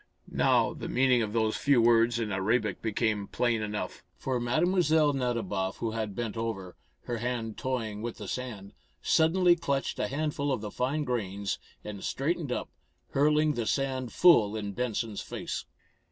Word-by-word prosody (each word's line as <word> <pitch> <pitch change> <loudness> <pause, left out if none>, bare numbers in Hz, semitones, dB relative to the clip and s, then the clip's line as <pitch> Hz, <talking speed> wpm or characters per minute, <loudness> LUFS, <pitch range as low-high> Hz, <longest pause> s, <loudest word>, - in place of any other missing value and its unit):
Now - - +3
the - - -6
meaning 125 -1 +3
of 110 -2 -2
those 110 -1 +1
few 140 -3 +3
words 115 0 +4
in 115 -3 -2
Arabic 105 +4 0
became 110 -2 0
plain 120 -3 0
enough. 105 -1 -4
For 130 -2 -1
Mlle. 120 +7 +1 0.5
Nadiboff, 110 -7 -1
who 115 - -2
had 110 -3 -3
bent 115 -3 -3
over, 110 -6 -4 0.3
her 120 - -3
hand 115 -2 -3
toying 115 -5 -3
with 120 0 -4
the - - -7
sand, 110 -6 -5 0.3
suddenly 175 +2 +4
clutched 140 -5 -2
a - - +1
handful 145 0 -1
of 130 - -1
the 105 -1 -5
fine 135 +7 -1
grains 100 -6 -2 0.2
and 105 -2 -7
straightened 150 0 -1
up, - - -3 0.4
hurling 150 +2 +3
the 115 -5 -2
sand 130 -3 -1
full 115 - +5
in 105 -2 -3
Benson's 115 -1 -2
face. - - -5
120 Hz, 160 wpm, -29 LUFS, 105-130 Hz, 0.5 s, full